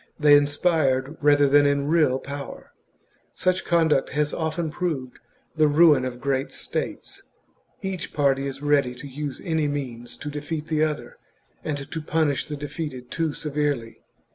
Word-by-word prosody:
169 150 -1 +2
they - - +11
inspired 145 -1 +2
rather 145 -1 +5
than 145 +1 +5
in 140 0 +1
real 155 -5 +3
power. 140 +1 -8 0.6
Such 185 +1 +1
conduct 160 -5 +2
^hap. - - -10
has 150 0 0
often 160 0 -2
proved 150 -7 -3 0.4
the 155 -1 +4
ruin 150 -3 +5
of 125 -1 -5
great 135 +1 -1
states. - - -5 0.6
Each 190 -3 -4
party 140 -1 +1
is 135 +1 -7
ready 140 -4 +2
to 130 - -9
use 140 0 -5
any 160 -4 0
means 125 -5 -5
to 150 - -6
defeat 150 +1 -5
the 155 -1 +2
other, 155 -1 -3 0.4
and 150 -2 -2
to 160 - -3
punish 155 -2 0
the 150 - -5
defeated 145 -4 -6
too 160 -3 -1
severely. 145 -6 -2
145 Hz, 160 wpm, -24 LUFS, 135-155 Hz, 0.6 s, they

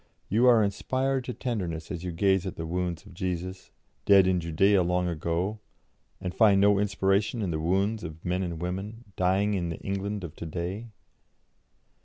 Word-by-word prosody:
You 115 +6 +4
are 115 -3 +6
inspired 130 +6 -1
to 125 - -4
tenderness 90 -10 -3
as 90 -2 -5
you 90 - -3
gaze 95 +2 +2
at 95 - -5
the 80 - -5
wounds 90 0 -3
of - - -13
Jesus, 90 +1 -4 0.3
dead 100 -2 +6
in 90 -1 +2
Judaea 90 +4 +3
long 90 +1 +1
ago, 85 +5 -2 0.6
and 90 -1 -4
find 105 -3 +5
no 100 0 +5
inspiration 100 +2 +1
in 90 - -1
the 80 - -2
wounds 95 +6 0
of 80 -1 -8
men 90 +1 0
and 85 -3 -3
women, 95 +6 -5
dying 95 +3 +2
in 90 -3 -1
the 85 - -4
England 100 +1 -3
of 85 -1 -7
to 85 - -6
day? 90 +8 -4
95 Hz, 180 wpm, -27 LUFS, 85-100 Hz, 0.6 s, are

